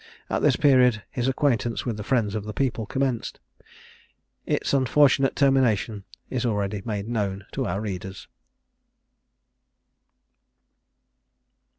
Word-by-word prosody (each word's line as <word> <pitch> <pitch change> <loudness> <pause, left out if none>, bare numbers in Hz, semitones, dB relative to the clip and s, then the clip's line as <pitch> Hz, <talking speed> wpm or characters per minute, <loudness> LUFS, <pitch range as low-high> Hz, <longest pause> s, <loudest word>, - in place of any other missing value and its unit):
At - - 0
this - - +4
period 125 -6 +4
his 125 0 -2
acquaintance 130 -4 0
with 120 -3 -2
the 105 - -6
Friends 110 -4 0
of 110 -2 -3
the 105 - -5
People 120 -4 -1
commenced. 130 -3 -2 1.1
Its - - -1
unfortunate 135 +1 +3
termination 120 -7 +2 0.2
is 130 -1 -3
already 105 -3 -1
made 105 -2 -4
known 100 -4 -2
to - - -2
our 95 +3 -2
readers. 95 -2 -6
115 Hz, 110 wpm, -25 LUFS, 105-130 Hz, 1.1 s, this